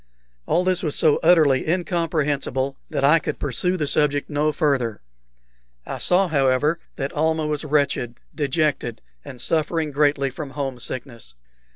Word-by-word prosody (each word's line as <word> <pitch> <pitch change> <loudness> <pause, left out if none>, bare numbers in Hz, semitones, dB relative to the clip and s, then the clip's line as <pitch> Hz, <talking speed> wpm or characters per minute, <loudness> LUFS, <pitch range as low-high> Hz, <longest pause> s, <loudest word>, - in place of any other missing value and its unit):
All 180 - +2
this 185 -1 +1
was 150 -4 -1
so 155 -3 +4
utterly 155 -5 +4
incomprehensible 155 -6 -1
that - - -2
I 150 +4 +6
could - - -4
pursue 180 +7 -1
the 155 - -1
subject 145 0 +1
no 150 +1 +1
further. 135 - -1 0.8
I - - -5
saw, 185 +2 +4
however, 145 +1 +2 0.2
that 135 0 -4
Almah 160 +1 0
was 150 0 -2
wretched, 140 -5 0 0.2
dejected, 145 -6 -1 0.2
and 135 -3 -10
suffering 160 +2 0
greatly 145 -1 +1
from 145 +2 -7
home 135 -3 -3
sickness. 120 - -7
150 Hz, 145 wpm, -22 LUFS, 135-160 Hz, 0.8 s, I